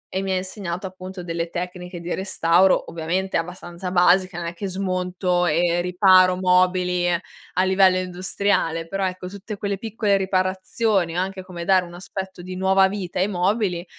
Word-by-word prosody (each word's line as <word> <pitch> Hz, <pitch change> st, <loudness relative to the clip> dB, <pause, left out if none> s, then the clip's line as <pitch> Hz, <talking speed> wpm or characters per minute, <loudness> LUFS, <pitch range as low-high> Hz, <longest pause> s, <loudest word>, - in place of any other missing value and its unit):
e 190 Hz, -, +1 dB
mi 190 Hz, -1 st, -1 dB
insegnato 185 Hz, -1 st, -4 dB
appunto 185 Hz, 0 st, -9 dB
delle 165 Hz, 0 st, -3 dB
tecniche 180 Hz, 0 st, -6 dB
di 170 Hz, +1 st, -4 dB
restauro; 190 Hz, -1 st, +2 dB
ovviamente 175 Hz, +4 st, -2 dB
abbastanza 175 Hz, +1 st, -4 dB
basica, 180 Hz, 0 st, +3 dB
non 170 Hz, -1 st, -4 dB
è 170 Hz, -, -4 dB
che 195 Hz, +3 st, -5 dB
smonto 180 Hz, -1 st, -1 dB
e 170 Hz, +2 st, +2 dB
riparo 185 Hz, 0 st, +5 dB
mobili 180 Hz, -1 st, +2 dB
a 175 Hz, +1 st, -3 dB
livello 190 Hz, -1 st, +4 dB
industriale, 180 Hz, -2 st, -1 dB
però 195 Hz, +2 st, -2 dB
ecco, 185 Hz, 0 st, -4 dB
tutte 200 Hz, +2 st, -8 dB
quelle 200 Hz, -1 st, -2 dB
piccole 215 Hz, -1 st, 0 dB
riparazioni 190 Hz, 0 st, 0 dB
o -, -, +2 dB
anche 190 Hz, 0 st, -3 dB
come 175 Hz, -2 st, -7 dB
dare 185 Hz, 0 st, +4 dB
un 175 Hz, 0 st, -11 dB
aspetto 190 Hz, 0 st, -7 dB
di 185 Hz, +1 st, -7 dB
nuova 190 Hz, +1 st, +4 dB
vita 190 Hz, -3 st, -4 dB
ai 190 Hz, -, +2 dB
mobili, 185 Hz, -1 st, 0 dB
185 Hz, 165 wpm, -22 LUFS, 175-190 Hz, -, riparo